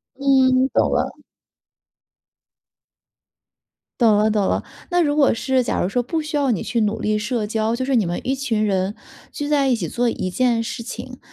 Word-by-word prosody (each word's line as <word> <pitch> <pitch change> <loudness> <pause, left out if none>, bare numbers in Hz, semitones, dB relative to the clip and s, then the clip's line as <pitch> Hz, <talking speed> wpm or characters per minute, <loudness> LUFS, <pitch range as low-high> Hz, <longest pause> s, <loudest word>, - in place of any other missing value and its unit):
嗯， 265 -1 +3
懂 - - +2
了。 - - -1 2.8
懂 225 -4 +5
了 215 +1 +3
懂 210 -2 +1
了。 - - 0 0.3
那 355 0 +3
如 290 -2 0
果 285 -5 +4
是， 260 +2 0
假 - - -1
如 - - 0
说 245 +5 0
不 320 +6 -2
需 305 0 -4
要 280 -3 +2
你 205 - -2
去 235 - -1
努 210 +1 -1
力 215 0 0
社 210 +1 -2
交， 220 +1 0
就 260 +2 -2
是 265 0 +1
你 215 -5 +2
们 175 +1 -3
一 260 - -1
群 235 -6 -1
人， 195 -1 0 0.4
聚 290 -1 -4
在 285 -2 +2
一 255 - +3
起 190 -8 -3
做 240 +8 0
一 185 -5 -2
件 235 +3 +1
事 230 +1 -5
情， 255 +1 -8
240 Hz, 205 characters per minute, -21 LUFS, 215-270 Hz, 2.8 s, 懂